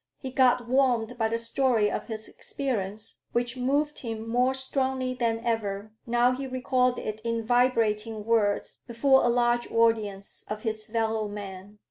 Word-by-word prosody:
He 260 - -6
got 250 -2 +3
warmed 245 -3 +2
by 225 - +3
the 230 +1 -1
story 230 -2 +1
of - - -4
his 220 -2 -6
experience, 220 -5 -4
which 240 +1 0
moved 285 +4 0
him 225 -2 -5
more 250 +3 +2
strongly 265 -1 -1
than 230 -2 0
ever, 215 -3 -2 0.2
now 240 +1 +3
he 265 +1 -3
recalled 255 -1 +1
it 215 0 -5
in 230 -1 -1
vibrating 225 -3 +1
words 220 -3 +1
before 265 +3 +4
a 240 - +3
large 240 0 +1
audience 220 -4 0
of 210 0 -5
his 220 -2 -3
fellow 220 -1 -1
men. 205 0 -8
230 Hz, 155 wpm, -27 LUFS, 220-255 Hz, 0.2 s, before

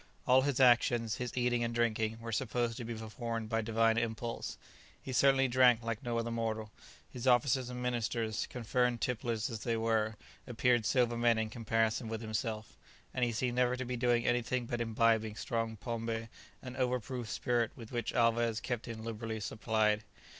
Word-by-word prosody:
All 130 +1 +6
his 140 -1 0
actions, 120 -3 +4
his 125 0 -5
eating 120 -1 +2
and 115 0 -2
drinking, 110 -1 0
were 115 0 -5
supposed 120 0 -1
to 125 - -5
be 115 0 -5
performed 115 0 -4
by 115 0 +1
divine 115 +1 +2
impulse. 115 0 -3 0.4
He 130 - -7
certainly 135 +1 +4
drank 125 -2 +5
like 115 -1 -3
no 120 -2 -2
other 115 0 -1
mortal; 110 -2 -2 0.4
his 125 +1 -6
officers 125 0 +3
and 125 0 -5
ministers, 115 -2 -1
confirmed 125 0 0
tipplers 115 -2 -1
as 115 - -4
they 115 +1 -1
were, 110 -1 +1 0.3
appeared 120 -2 +2
sober 120 -2 +2
men 120 -1 +3
in 110 -1 -1
comparison 115 0 0
with 110 0 -4
himself, 110 0 -3 0.4
and 125 - 0
he 120 - +2
seemed 120 +2 -1
never 125 0 +3
to 130 - -3
be 125 +1 -3
doing 120 -1 +2
anything 120 +1 0
but 120 0 -3
imbibing 110 -1 +2
strong 115 -1 -2
pombé, 115 0 -3 0.3
and 130 -1 -7
over 125 -1 +1
proof 120 0 -6
spirit 120 -2 0
with 115 -2 -11
which 120 -3 -2
Alvez 115 -1 +2
kept 120 0 -4
him 110 -2 -6
liberally 115 -1 -4
supplied. 110 0 0
115 Hz, 180 wpm, -33 LUFS, 110-125 Hz, 0.4 s, All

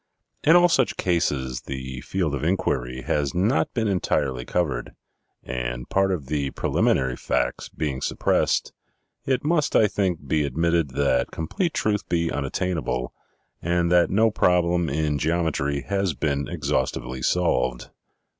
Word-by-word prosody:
In 160 +3 +6
all 175 0 +7
such 135 -7 +1
cases, 70 -8 0
the 65 -1 -5
field 90 -6 -2
of 70 - -3
inquiry 65 -8 -1
has 70 +2 -1
not 100 +8 +2
been 115 -3 +1
entirely 65 -9 0
covered; 70 -9 -2 0.5
and - - -4
part 95 0 +2
of 85 -7 -2
the 70 -1 -1
preliminary 65 -1 +1
facts - - -1
being 70 -4 -3
suppressed, - - +1 0.5
it 130 -1 0
must, 150 -1 +1
I 110 - +6
think, 95 -7 -1
be 75 +2 +2
admitted 80 +2 +1
that 70 -3 +2
complete 155 - -2
truth 105 -1 0
be 85 -1 +1
unattainable, 70 -3 -2 0.5
and 85 0 +1
that 90 -1 +5
no 110 +3 +3
problem 90 -4 +2
in 75 0 0
geometry 75 -3 0
has 95 +3 -1
been 70 -2 -1
exhaustively 65 0 -2
solved." 65 -6 0
80 Hz, 135 wpm, -24 LUFS, 65-90 Hz, 0.5 s, all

